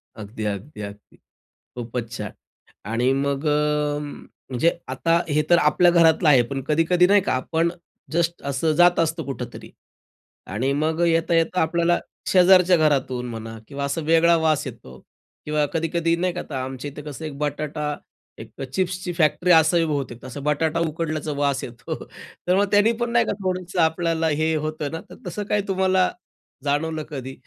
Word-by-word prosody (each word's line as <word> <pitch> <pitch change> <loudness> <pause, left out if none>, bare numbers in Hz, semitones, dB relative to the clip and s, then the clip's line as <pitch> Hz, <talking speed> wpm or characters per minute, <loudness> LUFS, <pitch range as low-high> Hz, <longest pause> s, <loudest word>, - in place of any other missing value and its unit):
अगदी, 110 +1 -7
अगदी, 105 +6 -5
अगदी. 100 0 -10 0.6
खूपच 120 -1 -5
छान. 105 -3 -5 0.6
आणि 125 +3 +2
मग 140 +2 -1
अ, 150 0 +1
म्हणजे 145 0 -3
आता 135 +6 +1
हे 150 +1 +2
तर 175 - +6
आपल्या 175 +2 +4
घरातलं 165 -1 +4
आहे. 135 -4 +6
पण 135 +3 -4
कधी-कधी 165 +3 +3
नाही 200 +1 +5
का 190 - -1
आपण 160 +6 0 0.4
जस्ट 170 +1 0
असं 155 +4 +1
जात 175 +2 +5
असतो 165 0 0
कुठेतरी 125 -3 -7 0.8
आणि 120 +8 -1
मग 155 +3 0
अ, - - +4
येता-येता 165 +1 +2
आपल्याला 170 +2 +2 0.3
शेजारच्या 180 -1 +6
घरातून 135 -5 +1
म्हणा 115 -1 -7
किंवा 140 0 -5
असा 140 +4 -2
वेगळा 170 +1 +5
वास 160 -2 +1
येतो 105 - -10 0.5
किंवा 150 0 +1
कधी-कधी 165 0 0
नाही 180 +1 -1
का 180 - -4
आता 135 -3 -4
आमच्या 130 +2 -6
इथे 145 - -9
कसं 150 +2 -7
एक 145 -3 -6
बटाटा, 150 0 -2 0.4
एक - - -11
चिप्सची 185 -1 -2
फॅक्टरी 165 +2 +2
असावी 165 +1 +4
बहुतेक, 140 -6 -4
असं 135 +2 -7
बटाटा 155 +2 0
उकडल्याचा 155 -1 -3
वास 140 -2 0
येतो. 120 -1 -6 0.5
तर 180 - +4
मग 200 - +4
त्यानी 205 +2 +5
पण 240 - 0
नाही 235 0 +3
का - - -1
थोडंसं 185 -1 -1
आपल्याला 165 0 +1
हे 160 0 +2
होतं 155 -1 -3
ना? 165 - -5
तर - - -11
तसं 205 +4 -4
काही 210 - +2
तुम्हाला 190 -1 +2 0.5
जाणवलं 155 +2 -1
कधी 135 -3 -6
155 Hz, 165 wpm, -23 LUFS, 140-170 Hz, 0.8 s, तर